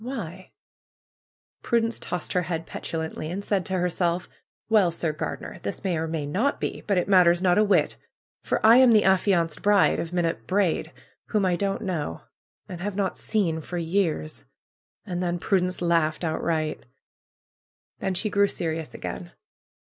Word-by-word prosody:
Why 190 -8 -6 0.6
?" - - -73
Prudence 230 -1 0
tossed 180 -2 -4
her 180 - +2
head 165 -1 -3
petulantly 160 -1 -5
and 195 +4 -5
said 195 -3 0
to 190 - -1
her 180 0 +1
self: 175 0 -1 0.4
^^Well, 200 -6 +5
Sir 165 -1 -1
Gardener! 150 - -5
This 100 - -5
may 185 -3 0
or 160 0 -2
may 160 -2 -3
not 210 - 0
be; - - -3
but 200 -3 +2
it 180 - +1
matters 180 -3 +5
not 185 +1 +3
a - - +5
whit 205 - +2 0.5
for - - 0
I 225 +2 +8
am 255 -2 +7
the 215 - +5
affianced 185 -4 +2
bride 205 -1 +4
of 165 - -4
Minot 165 -10 -1
Braid, 190 -3 +1 0.4
whom 210 -3 +1
I 180 -1 +2
don't 200 +4 -2
know, 160 - -3 0.5
and 175 -2 -7
have 205 +1 -3
not 195 -2 -1
seen 170 -7 0
for 175 +3 -6
years 165 -2 -1 0.3
!" - - -57
And 180 -3 -3
then 175 -1 -1
Prudence 180 -1 0
laughed 165 -1 +1
outright. 160 -2 -1 1.1
Then 190 -1 -2
she 215 +3 -1
grew 200 0 +4
serious 160 -4 -3
again. 175 -1 -6
180 Hz, 170 wpm, -25 LUFS, 165-200 Hz, 1.1 s, I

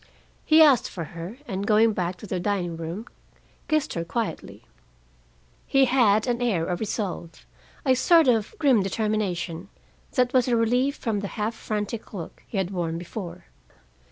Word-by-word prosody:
He 315 +1 +8
asked 275 -6 +5
for 170 - -5
her, 175 +7 -7
and 195 +1 -3
going 220 +1 +4
back 180 -2 -2
to 180 - -11
the 185 -2 -3
dining 180 -3 -1
room, 165 +7 -5 0.6
kissed 310 -2 0
her 170 - -2
quietly. 225 +6 -4 1.0
He 270 -1 +4
had 230 -5 +3
an 245 -1 -1
air 200 -9 +1
of 175 0 -2
resolve, 200 -6 -4 0.4
a 260 - +5
sort 325 +4 +5
of 225 - +2
grim 270 - +4
determination, 195 -3 -2 0.4
that 250 0 +2
was 255 -1 +3
a 245 - +2
relief 250 +5 +2
from 220 -4 -2
the 200 - -3
half 215 +2 -1
frantic 215 0 -4
look 170 -4 -8
he 215 - -5
had 190 -1 -1
worn 170 -3 -2
before. 175 - -7
210 Hz, 160 wpm, -25 LUFS, 180-245 Hz, 1.0 s, He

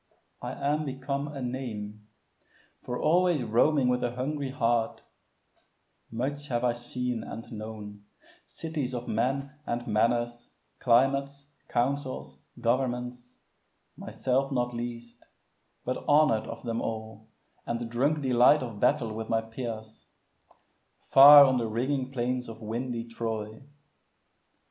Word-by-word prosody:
I - - -4
am 150 +2 0
become 140 +1 -3
a 140 -3 -6
name; 110 -5 -5 0.7
For 125 0 -4
always 175 -3 +3
roaming 125 +5 +3
with 125 0 +1
a 120 0 -2
hungry 140 +2 -2
heart 115 -3 0 1.1
Much 140 +5 -3
have 120 -2 -1
I 120 -1 +3
seen 120 -1 -3
and 115 - -8
known, 105 -2 -8 0.4
cities 150 -6 -4
of 120 0 -5
men 135 +5 -1 0.2
And 120 0 -2
manners, 120 +2 0 0.3
climates, 140 +3 +2 0.2
councils, 130 +2 -2 0.2
governments, 125 0 -2 0.6
Myself 135 +2 -1
not 125 -2 0
least, 120 0 -7 0.6
but 125 - -3
honor'd 145 -7 +4
of 115 0 -8
them 115 -1 -2
all, 110 -1 -6 0.4
And 115 0 -2
drunk 140 +6 0
delight 130 +3 +5
of 115 -4 -7
battle 110 0 +2
with 110 0 -6
my 115 0 +2
peers, 110 -1 -7 1.0
Far 145 +1 +10
on 130 -2 +2
the 115 - -1
ringing 130 +4 -1
plains 125 -1 -2
of 110 0 -9
windy 115 +2 -3
Troy. 110 -1 -5
125 Hz, 120 wpm, -28 LUFS, 115-135 Hz, 1.1 s, Far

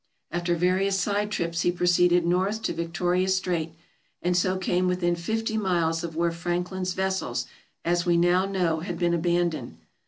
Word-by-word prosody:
After 175 +1 0
various 190 +3 +1
side 205 +3 0
trips 170 -4 -2
he 175 - +2
proceeded 175 0 +3
north 190 +5 0
to - - -1
Victoria 175 +2 0
Strait, 180 -4 0 0.5
and 180 +1 +1
so 185 +1 +2
came 185 0 0
within 180 -1 +1
fifty 220 +5 -2
miles 170 -4 0
of 165 -2 -5
where 170 +1 +1
Franklin's 180 +2 -2
vessels, 190 0 -1 0.4
as 175 +1 +2
we 175 -1 +2
now 175 +2 +3
know, 180 -5 0
had 175 +1 -5
been 170 0 +1
abandoned. 170 - 0
175 Hz, 160 wpm, -26 LUFS, 170-185 Hz, 0.5 s, proceeded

